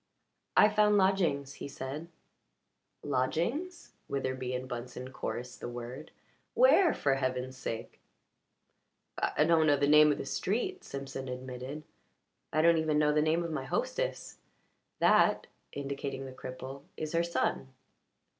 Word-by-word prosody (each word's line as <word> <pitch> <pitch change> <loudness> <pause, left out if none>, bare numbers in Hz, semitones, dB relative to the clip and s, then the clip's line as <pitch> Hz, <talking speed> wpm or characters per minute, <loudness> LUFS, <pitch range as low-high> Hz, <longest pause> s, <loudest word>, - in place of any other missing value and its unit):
"I - - +8
found 210 0 +4
lodgings," 175 -8 +2
he - - -4
said. 140 +3 -6 1.0
"Lodgings?" 170 - -1 0.2
Witherbee 130 -2 -2
and 130 +1 -4
Bunsen 125 +1 -6
chorused 125 -1 -5
the - - -5
word. 120 +5 -7 0.5
"Where, 460 -7 +6
for 140 - +1
heaven's 130 -1 -2
sake?" 115 -3 -6 1.2
"I - - +2
don't 160 -1 +4
know 145 -1 +5
the 140 - +2
name 150 0 +7
of 145 - 0
the - - -5
street," 245 - -2
Simpson 135 -1 -6
admitted. 130 +3 -6 0.7
"I 155 +1 +2
don't 170 -1 +5
even 155 -1 +1
know 150 0 +3
the 150 - +3
name 160 +2 +2
of 170 - -4
my 155 - -3
hostess. - - -2 0.6
That" - - +4 0.3
indicating 140 -1 -4
the 130 - -7
cripple 130 +2 -8 0.2
"is 155 0 -4
her 165 - +3
son." 65 - -1
140 Hz, 135 wpm, -31 LUFS, 130-170 Hz, 1.2 s, I